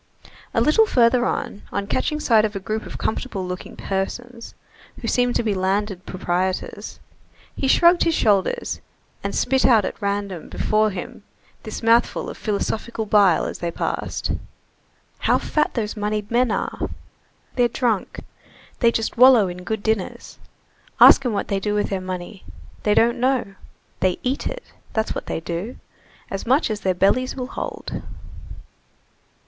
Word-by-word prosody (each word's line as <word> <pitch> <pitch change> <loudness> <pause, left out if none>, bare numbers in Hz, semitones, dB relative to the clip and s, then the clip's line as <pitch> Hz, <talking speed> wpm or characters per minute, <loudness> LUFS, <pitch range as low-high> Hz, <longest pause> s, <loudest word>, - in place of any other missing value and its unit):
A - - +3
little 435 +9 +4
further 245 - +3
on, 205 - -3
on 200 0 -2
catching 300 +8 -1
sight 225 -7 +4
of 215 -1 -1
a - - -2
group 215 +3 -4
of - - -7
comfortable 220 -4 -3
looking 180 0 -6
persons, 230 +5 -4 0.4
who - - -5
seemed 245 -1 +1
to - - +1
be 215 -2 0
landed 195 0 -1
proprietors, 185 0 -3 0.6
he 270 - -1
shrugged 345 +5 +5
his 330 -1 +2
shoulders 200 -4 +1 0.4
and - - -3
spit 265 -1 +2
out 220 -5 +5
at - - -5
random 200 -3 -3
before 215 0 +1
him 185 0 -7 0.4
this 215 +1 -7
mouthful 230 +1 +2
of - - -11
philosophical 220 +2 -2
bile 200 -5 +4
as - - -5
they 170 - -2
passed: - - -3 0.9
"How - - +3
fat 300 -1 0
those 215 -3 -2
moneyed 210 0 -2
men 245 +1 +3
are! - - -2 0.7
They're 245 -2 +4
drunk! 235 -5 -1 0.6
They 235 -2 +4
just 225 0 -2
wallow 250 -5 +7
in 180 +1 -8
good 215 +2 -3
dinners. 220 -4 -2 0.6
Ask - - +9
'em - - 0
what 205 - -2
they 195 - 0
do 210 +1 -1
with 205 - 0
their 190 -1 -1
money. 185 +1 -6 0.4
They 210 -1 +2
don't 235 +1 +3
know. 250 -5 +1 0.5
They 185 -1 +1
eat 260 +3 -1
it, - - -5 0.3
that's 220 0 0
what - - -6
they - - -3
do! 175 +9 -5 0.5
As 195 +3 -4
much 265 0 +3
as 210 - -2
their 185 -2 0
bellies 250 +8 +2
will 260 - -4
hold." 255 - -5
215 Hz, 160 wpm, -22 LUFS, 195-245 Hz, 0.9 s, Ask